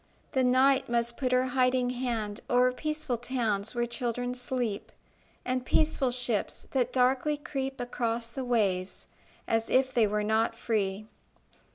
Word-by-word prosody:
The 260 - +2
night 260 +1 +4
must 235 0 +1
put 255 -1 -1
her 255 0 +3
hiding 250 -1 +2
hand 235 -4 -3
O'er 250 +1 +4
peaceful 305 -2 -2
towns 225 -4 -1
where 240 0 +1
children 245 0 -2
sleep, 250 -4 -3 0.5
And 255 0 -1
peaceful 280 -1 +2
ships 245 -4 -1
that 255 -3 +1
darkly 265 +4 +2
creep 270 -2 -4
Across 235 -1 -2
the 265 +2 -4
waves, 200 -7 0 0.4
as 225 0 0
if 260 0 +2
they 230 -3 +4
were 210 +1 -1
not 220 +2 +1
free. 210 -3 -1
245 Hz, 145 wpm, -29 LUFS, 230-255 Hz, 0.5 s, night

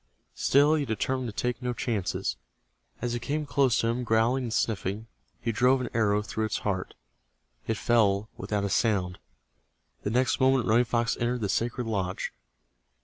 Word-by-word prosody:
Still 145 +3 +4
he 155 -2 +1
determined 130 +1 -1
to 105 - -10
take 125 +1 -2
no 125 -1 -1
chances. 110 -5 -2 0.7
As 120 -1 -1
it 120 - -3
came 150 +5 -2
close 140 -4 +2
to 115 - +1
him, 120 +2 -1
growling 120 +3 +2
and 115 - -4
sniffing, 110 -1 -1 0.3
he 115 - -1
drove 125 +4 +3
an 130 - -3
arrow 105 -2 +2
through 110 0 -2
its 110 - -1
heart. 95 -3 -2 0.7
It 110 - 0
fell 105 -3 +2
without 105 -1 -2
a 100 - -1
sound. 95 -5 +1 0.8
The - - -2
next 125 +4 +1
moment 130 -2 +3
Running 115 +2 +4
Fox 115 -1 0
entered 120 +1 0
the 100 - -1
sacred 120 +4 -1
lodge. 95 -4 -2
115 Hz, 170 wpm, -28 LUFS, 105-125 Hz, 0.8 s, Still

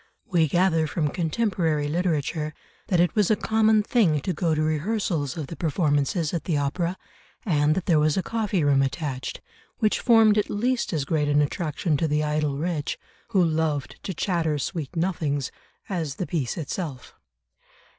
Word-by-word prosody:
We 175 -8 +2
gather 165 0 +2
from 150 -1 -1
contemporary 165 -3 0
literature 155 -2 -1 0.3
that 180 - +2
it 175 0 +3
was 210 -4 +2
a 215 - +5
common 220 0 +3
thing 200 -10 +2
to 185 - -2
go 165 -4 0
to 155 - +1
rehearsals 155 - -1
of 155 - -3
the 165 - -8
performances 155 0 0
at 170 - -2
the 160 -5 0
opera, 170 +6 -1 0.5
and 150 -5 +2
that 185 - -2
there 165 -4 +4
was 150 +2 +2
a 190 - +1
coffee 210 -7 -1
room 140 -1 +4
attached, 135 -1 -3 0.4
which 215 -3 +1
formed 225 -3 +5
at 210 - -1
least 240 +4 0
as 155 -5 -1
great 150 -1 0
an 145 0 +3
attraction 155 +1 0
to 160 - 0
the 150 0 +1
idle 150 -2 0
rich, 160 -1 -2 0.3
who 195 -7 +3
loved 155 -3 -1
to - - -4
chatter 165 -4 0
sweet 150 +2 -4
nothings, 155 -6 -1 0.4
as 165 -8 -3
the 185 - -3
piece 155 -10 -2
itself. 155 -4 -5
160 Hz, 170 wpm, -25 LUFS, 150-185 Hz, 0.5 s, a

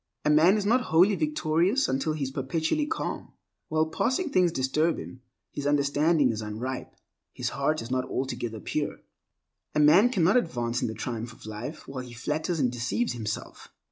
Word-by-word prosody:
A 150 - +4
man 165 +7 +5
is 205 - -2
not 240 +5 +3
wholly 180 +6 +5
victorious 165 - +1
until 135 +4 0
he 155 -2 -3
is 135 - -3
perpetually 160 - -1
calm. 325 - -4 0.3
While 155 0 +1
passing 260 - -1
things 180 -2 +3
disturb 155 +3 +1
him, 130 - -9 0.3
his 145 -1 -3
understanding 145 0 +3
is 110 -1 -4
unripe, 110 +5 -5 0.4
his - - -2
heart 145 +1 -1
is 115 - -8
not 130 0 0
altogether 120 -4 -3
pure. - - -3 0.7
A - - +3
man 165 +10 +6
cannot 195 -2 +3
advance 120 - -1
in - - 0
the 110 - -5
triumph 115 +1 -4
of - - -15
life 115 +9 -7
while 130 -2 -5
he 125 -1 -11
flatters 155 +8 -2
and 125 -4 +2
deceives 125 - -1
himself. 110 -3 -5
150 Hz, 175 wpm, -27 LUFS, 125-170 Hz, 0.7 s, man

